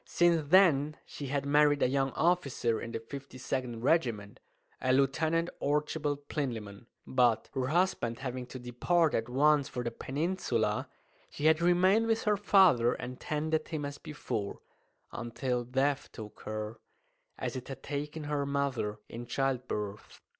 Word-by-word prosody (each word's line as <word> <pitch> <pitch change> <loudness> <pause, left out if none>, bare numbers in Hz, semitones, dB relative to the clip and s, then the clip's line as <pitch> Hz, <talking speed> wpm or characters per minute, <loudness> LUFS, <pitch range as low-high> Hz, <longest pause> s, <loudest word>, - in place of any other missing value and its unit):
Since 170 -4 +2
then 155 -5 +5
she 140 - -7
had 140 +1 -1
married 145 0 +4
a - - +5
young 135 +1 +1
officer 140 -9 +1
in 115 - -6
the - - -2
52nd 130 -1 -5
Regiment, 115 -10 +1 0.4
a 130 - +2
Lieutenant 160 +5 +2
Archibald 145 0 -1
Plinlimmon; 115 -7 -4 0.2
but, 120 -3 +2
her 130 -2 -1
husband 155 -8 +1
having 125 -2 -5
to 130 - -8
depart 135 +7 +1
at 115 +1 -1
once 145 +2 +3
for 125 - -4
the 120 - -2
Peninsula, 130 - -1 0.4
she 145 - -5
had 160 +1 +5
remained 185 +6 +4
with 225 0 +1
her 210 -1 +3
father 190 - +5
and 125 0 -7
tended 155 +1 -1
him 155 -3 -3
as 145 0 -6
before, 110 -9 -4 0.5
until 120 +1 -2
death 135 +3 0
took 105 -2 -10
her 110 +1 -4 0.6
as - - -3
it 130 -1 -6
had 135 -1 -8
taken 150 +2 -4
her 145 -1 -1
mother 140 -7 -1
in 120 +1 -8
childbirth. 120 -6 -3
140 Hz, 145 wpm, -31 LUFS, 120-155 Hz, 0.6 s, then